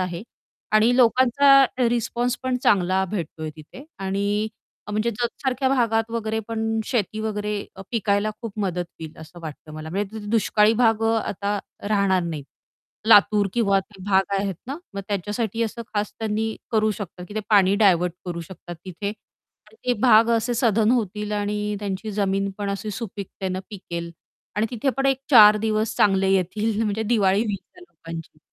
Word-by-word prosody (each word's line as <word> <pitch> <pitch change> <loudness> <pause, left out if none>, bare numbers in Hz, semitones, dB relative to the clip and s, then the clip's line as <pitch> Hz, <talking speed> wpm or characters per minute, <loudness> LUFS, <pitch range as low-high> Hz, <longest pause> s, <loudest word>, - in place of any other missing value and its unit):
आहे 180 0 -3 0.5
आणि 225 +3 +4
लोकांचा 260 +3 +4 0.3
अ, - - +2
रिस्पॉन्स 240 +1 -1
पण 260 -1 0
चांगला 190 -1 +3
भेटतोय 160 -5 -4
तिथे. 155 - -12
आणि 200 +2 -1 0.4
अ, - - -7
म्हणजे 215 +3 0
जत 235 +2 -1
सारख्या 265 0 +1
भागात 230 -4 +1
वगैरे 220 -1 -2
पण 225 0 -1
शेती 215 -3 -1
वगैरे 210 -1 -2 0.2
अ, 195 - -8
पिकायला 210 -2 +1
खूप 220 -2 -7
मदत 180 -2 -1 0.2
होईल 160 -1 -8
असं 165 +2 -12
वाटतं 155 0 -9
मला. 155 0 -7
म्हणजे 200 +3 -3
तिथे 205 -1 -7
दुष्काळी 215 -1 +3
भाग 225 -1 +3
अ, 225 0 +3
आता 205 +1 -2 0.3
राहणार 200 -3 +2
नाहीत. 160 -5 -4 0.6
लातूर 205 -1 +6
किंवा 200 -5 +3
ते 195 0 -17
भाग 195 0 +2
आहेत 195 -1 -1
ना, 275 +3 -4 0.2
मग 200 - -3
त्याच्यासाठी 210 +3 -2
असं 230 +1 -3
खास 205 0 -1
त्यांनी 220 0 -2
करू 215 -1 +2
शकतात, 190 -3 -6
की 205 - -10
ते 215 - -1
पाणी 200 -2 +5
डायव्हर्ट 180 -3 +4
करू 175 -2 -4
शकतात 175 0 -9
तिथे 190 +2 -5
आणि 220 - -19
ते - - +5
भाग 230 -1 +6
असे 230 +2 -1
सधन 225 -2 +3
होतील 210 -3 -1
आणि 210 0 -1
त्यांची 200 +1 -4
जमीन 195 -1 0
पण 200 -1 -2
अशी 205 +2 -4
सुपीकतेने 195 -3 -5
पिकेल. 170 -4 -6 0.5
आणि 215 +2 +2
तिथे 250 +3 0
पण 270 0 +1
एक 270 -1 +2
चार 215 -4 +9
दिवस 215 0 0
चांगले 195 -1 +3
येतील 210 +4 0
म्हणजे 215 0 -1
दिवाळी 205 -3 +2
होईल 205 -2 -1 0.2
त्या 360 - -15
लोकांची. 165 -2 -9
210 Hz, 170 wpm, -23 LUFS, 195-225 Hz, 0.6 s, चार